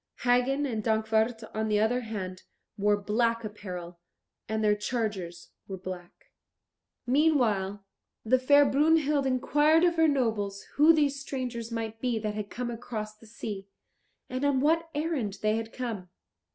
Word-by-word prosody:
Hagen 250 +3 +2
and 225 -5 -2
Dankwart, 220 +1 +1
on 220 0 -1
the 210 -1 +2
other 225 +4 +2
hand, 190 -5 -5 0.3
wore 205 0 +2
black 230 +3 0
apparel, 180 -5 -7 0.5
and 220 0 -1
their 210 -1 +4
chargers 205 -6 -4 0.2
were 195 - -5
black. 185 - -9 0.7
Meanwhile 235 -9 +2 0.4
the 255 +4 +4
fair 285 +3 +6
Brunhild 295 -1 +3
inquired 295 +5 +3
of 345 -1 +3
her 325 0 +5
nobles 220 -8 0
who 300 +3 +6
these 290 -3 +2
strangers 245 -4 -4
might 225 -1 -4
be 245 -3 0
that 215 -1 -2
had 210 -1 -5
come 240 0 -4
across 220 -2 -5
the 225 +1 -18
sea, 205 -3 -6 0.6
and 255 +2 -4
on 285 -2 +3
what 325 +4 +2
errand 290 -10 -2
they 215 0 +3
had 225 0 -5
come. 225 -8 -5
230 Hz, 150 wpm, -28 LUFS, 210-275 Hz, 0.7 s, fair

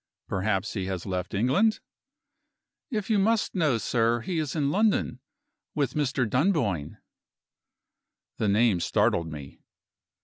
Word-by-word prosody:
"Perhaps 95 +1 -1
he 95 -4 -3
has 95 -2 -4
left 90 -1 -3
England?" 135 - +2 1.1
"If 215 -4 -2
you 210 - +3
must 220 +2 +1
know, 155 -10 +2
sir, 115 +1 +1
he 170 +6 -2
is 150 -2 -3
in 145 -3 +1
London 200 - +1 0.6
with 140 -4 0
Mr. 135 -4 0
Dunboyne." 125 - 0 1.4
The 110 - 0
name 105 -2 +3
startled 85 0 +1
me. 70 -3 -9
125 Hz, 125 wpm, -27 LUFS, -, 1.4 s, you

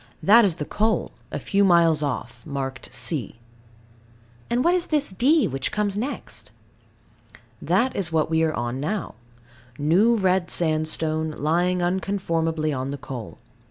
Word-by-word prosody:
That 220 +6 +7
is 180 -5 +1
the 150 - -4
coal, 220 +6 0 0.2
a - - -3
few 200 0 +1
miles 170 -4 +4
off, 120 -4 -4
marked 135 -3 -5
C. 130 - -2 1.1
And 240 +2 +1
what 345 - +4
is 360 -1 0
this 295 -7 +1
D, 280 - +3
which 135 -1 -3
comes 205 -2 -1
next? 250 +7 -5 1.1
That 255 +2 +1
is 175 -4 -1
what 160 -1 +1
we 160 0 +1
are 160 -1 +1
on 120 +2 -3
now. 195 +9 -3 0.6
New 180 +11 +3
red 190 -3 +1
sandstone, 155 -1 0
lying 175 +4 +1
unconformably 165 -4 -1
on 130 +1 -3
the 140 - -4
coal. 125 -4 -8
165 Hz, 145 wpm, -24 LUFS, 150-200 Hz, 1.1 s, That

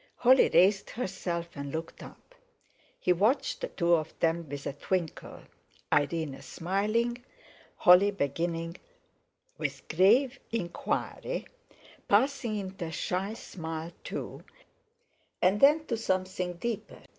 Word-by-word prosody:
Holly 255 +2 +5
raised 195 +3 +4
herself 180 -6 -3
and 140 -1 -6
looked 160 +2 -6
up. - - -13 0.7
He 180 - +3
watched 240 - +1
the - - -1
two 170 - +1
of 160 -1 0
them 165 -1 0
with 140 0 -6
a - - -2
twinkle, 170 +3 -3 0.5
Irene 145 -2 0
smiling, 215 - -1 0.5
Holly 180 +3 +7
beginning 165 0 -2 0.8
with - - -4
grave 235 - +4
inquiry, 230 - -3 0.6
passing 235 0 +2
into 190 -2 -5
a 160 - -5
shy 190 +6 -2
smile 165 -4 -6
too, - - -6 1.0
and 190 +3 +3
then 300 +3 +6
to 240 - -1
something 185 -3 -1
deeper. 225 +5 -5
185 Hz, 115 wpm, -29 LUFS, 165-225 Hz, 1.0 s, Holly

